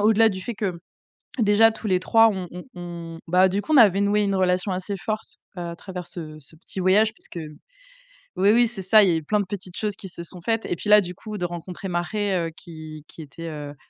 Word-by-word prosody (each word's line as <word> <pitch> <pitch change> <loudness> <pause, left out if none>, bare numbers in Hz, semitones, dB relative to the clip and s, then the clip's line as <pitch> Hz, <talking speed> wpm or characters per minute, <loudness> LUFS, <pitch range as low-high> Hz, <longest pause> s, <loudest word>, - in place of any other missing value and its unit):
au-delà 220 +1 +5
du 190 -2 -6
fait 240 - -5
que, 195 -4 -3 0.6
déjà 220 +1 +5
tous 220 0 -7
les 185 -2 +2
3, 225 +4 +5
on 190 -4 -4
on 180 +1 -8
on 170 -2 -8
bah, 180 +2 +5
du 195 +2 -1
coup, 310 - -2
on - - +6
avait 200 -5 +6
noué 205 +1 +2
une 200 -1 0
relation 185 +1 +1
assez 190 +2 -4
forte 215 +3 -5 0.2
à 170 -2 -5
travers 180 -2 -7
ce 160 -3 -7
ce 145 +3 -13
petit 185 +3 -6
voyage 210 +4 +4
parce - - -13
que 170 - -7 1.0
oui, 200 +2 +4
oui, 240 +1 +5
c'est 220 -4 -6
ça, 210 +4 +6
il 190 - +3
y - - +3
a - - +1
eu 160 - -2
plein 210 +7 +1
de - - -1
petites 185 -2 -6
choses 210 -2 -2
qui 190 - -9
se 170 -1 -8
sont 175 +1 -9
faites 225 +4 -1
et - - -1
puis 205 - -7
là, 210 0 +9
du 180 -2 -6
coup, 215 +3 -7
de 180 - -2
rencontrer 175 +2 -7
Mare 180 0 -1
qui 155 -3 -10
qui 165 - -11
était, 160 +3 -9
heu, 145 -2 -7
185 Hz, 245 wpm, -24 LUFS, 175-210 Hz, 1.0 s, là